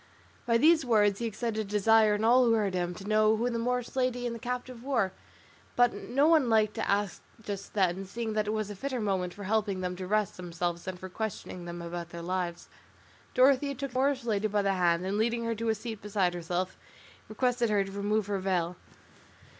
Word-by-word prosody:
By 230 -1 +4
these 315 +4 +5
words 210 -5 +3
he 235 - -1
excited 225 0 -3
a - - 0
desire 210 +1 +4
in 210 - -2
all 245 +3 +5
who 230 - +4
heard 210 -4 +1
him, 175 -1 -1
to 195 - -9
know 215 0 +4
who 240 +3 0
the 230 - -2
Moorish 250 +1 -2
lady 250 -1 0
and 240 - -2
the 230 - -7
captive 250 0 -5
were, 230 -8 +1 0.6
but 245 0 +4
no 275 +5 +1
one 315 -7 +4
liked 215 -1 +3
to - - -3
ask 200 -2 0 0.2
just 200 -2 -7
then, 190 -1 +1
seeing 220 +3 -4
that 215 -1 0
it - - 0
was 215 -1 -2
a - - -6
fitter 260 +4 -3
moment 190 -4 -1
for 200 +3 -9
helping 205 -2 0
them 180 0 -2
to 185 0 -5
rest 210 0 0
themselves 175 -1 -3
than 185 -1 -5
for 185 - -8
questioning 185 -3 -5
them 170 0 -6
about 170 0 -5
their 170 -1 -8
lives. 180 -1 -3 0.7
Dorothea 275 +2 +4
took 275 0 -5
the 255 - -2
Moorish 270 -1 +1
lady 215 -2 0
by 205 -1 0
the 195 0 +2
hand 175 -1 +2
and 200 +2 -1
leading 235 +1 +1
her 230 - 0
to 230 +1 -2
a 220 - +2
seat 220 0 -7
beside 195 -3 0
herself, 175 +2 -3 0.5
requested 240 +1 +1
her 205 -2 +3
to 195 - -8
remove 205 +1 0
her 200 -1 -2
veil. 180 -2 -1
210 Hz, 220 wpm, -29 LUFS, 185-235 Hz, 0.7 s, these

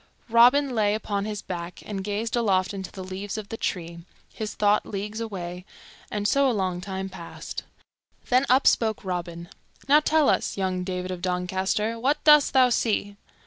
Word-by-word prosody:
Robin 250 +4 +5
lay 210 -2 +2
upon 205 -2 -2
his 210 -1 -5
back 175 -1 -6
and 195 -2 -4
gazed 210 +4 -2
aloft 195 -5 +1
into 190 -2 -6
the 190 - -8
leaves 195 +3 -5
of 210 -2 -7
the - - -4
trees, 170 -6 -4 0.3
his 215 -1 -5
thought 210 0 +3
leagues 210 +2 -5
away, 180 -5 -5 0.5
and 205 -1 -1
so 275 +3 +3
a 225 -5 0
long 185 -2 -1
time 190 0 -4
passed. 175 -3 -8 0.7
Then 255 +2 +3
up 260 +2 +4
spoke 220 -3 +2
Robin, 170 -2 -4 0.4
"Now 290 +2 +7
tell 305 0 +2
us, - - +1
young 185 -1 -1
David 180 0 -4
of 180 -1 -5
Doncaster, 190 +5 -1
what 285 +5 0
dost 300 -2 +6
thou 260 -2 +5
see?" 205 -4 0
205 Hz, 175 wpm, -25 LUFS, 185-230 Hz, 0.7 s, Now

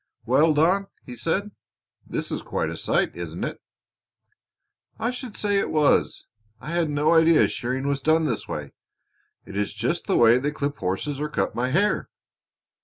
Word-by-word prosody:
"Well, 150 +6 +4
Don," 185 +6 +3 0.2
he 125 - -8
said, 190 - -1 0.6
"this - - -3
is - - -2
quite - - -2
a - - -5
sight, - - 0
isn't - - -5
it?" - - -4 1.4
"I 235 - -1
should 245 -3 -7
say 205 -1 +1
it - - -1
was! 150 -2 +2 0.3
I 155 - -7
had 170 -2 +1
no 150 +2 +2
idea 165 -1 +5
shearing 130 +3 -3
was 140 -1 -1
done 160 +3 +3
this 120 -7 -2
way. 70 -2 -6 0.7
It 100 - -10
is 105 0 -2
just 125 +11 -2
the 195 - +2
way 120 +1 +6
they 140 +3 -1
clip 145 -1 -3
horses 95 +10 -2
or 150 0 -2
cut - - -1
my 125 +2 -1
hair." 200 +9 +1
150 Hz, 175 wpm, -24 LUFS, 125-170 Hz, 1.4 s, way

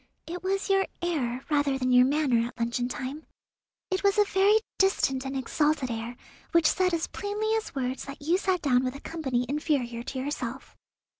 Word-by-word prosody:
It 350 +2 -6
was 390 +1 -1
your 390 -1 +3 0.2
air, 265 -7 -1
rather 285 -2 +2
than 255 -1 0
your 250 0 +6
manner 265 -5 +2
at 240 - -13
luncheon 235 +1 -1
time. 265 +5 -5 0.6
It 375 - 0
was 400 +1 +3
a 415 - +7
very 395 +1 +4 0.2
distant 270 -9 +2
and 270 0 -3
exalted 290 -1 0
air, 230 +1 -4 0.4
which 335 -1 +4
said 365 +3 +3
as 335 -2 0
plainly 420 +2 -2
as 440 - -5
words 260 -1 -2
that 275 0 -8
you 330 +6 +1
sat 375 -3 0
down 255 -3 +3
with 255 +1 -2
a - - -7
company 265 -8 -2
inferior 270 -5 -1
to 260 +2 -6
yourself." 260 -2 -4
285 Hz, 190 wpm, -28 LUFS, 255-360 Hz, 0.6 s, a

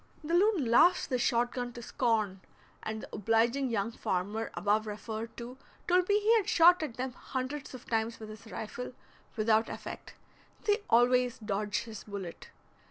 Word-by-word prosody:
The 320 +3 -3
loon 370 - +4
laughs 340 +10 +5
the 255 -2 -1
shot 240 -1 +2
gun 245 -2 -4
to 240 - -8
scorn, 215 -5 0 0.4
and 220 0 -5
the - - -9
obliging 230 +5 +2
young 225 -1 -1
farmer 205 +2 -2
above 210 +4 +1
referred 220 +2 -6
to 245 +2 -8 0.3
told 360 +1 +3
me 410 +1 +4
he 435 +2 +4
had 425 -1 0
shot 350 -3 +6
at 295 -7 -4
them 255 0 -3
hundreds 265 +2 -5
of 250 - -11
times 225 0 -1
with 220 -1 -8
his 215 +1 -11
rifle, 245 +4 -6 0.4
without 220 0 +2
effect, - - -8 0.5
they 420 +1 +2
always 245 +1 +4
dodged 210 -1 -2
his 220 -3 -9
bullet. 195 -5 -7
235 Hz, 165 wpm, -31 LUFS, 215-265 Hz, 0.5 s, shot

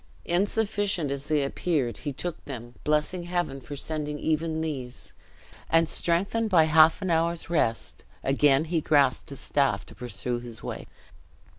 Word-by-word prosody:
Insufficient 200 -3 0
as 140 0 -4
they 150 -2 +2
appeared, 140 -3 -1
he 145 - -4
took 170 +5 -5
them, 120 -4 -7
blessing 150 +4 0
Heaven 175 -6 -2
for 145 +3 -7
sending 150 0 -3
even 160 +1 -1
these, 135 -6 -5 0.6
and 165 0 +4
strengthened 200 +8 0
by 170 -5 +6
half 160 +4 +5
an 185 - 0
hour's 165 +1 0
rest, 115 -9 0 0.2
again 140 +2 +3
he 165 0 0
grasped 140 -4 +2
his 140 - -8
staff 140 -2 +1
to - - -12
pursue 120 +1 -3
his 120 -2 -10
way. - - -5
155 Hz, 150 wpm, -27 LUFS, 135-170 Hz, 0.6 s, by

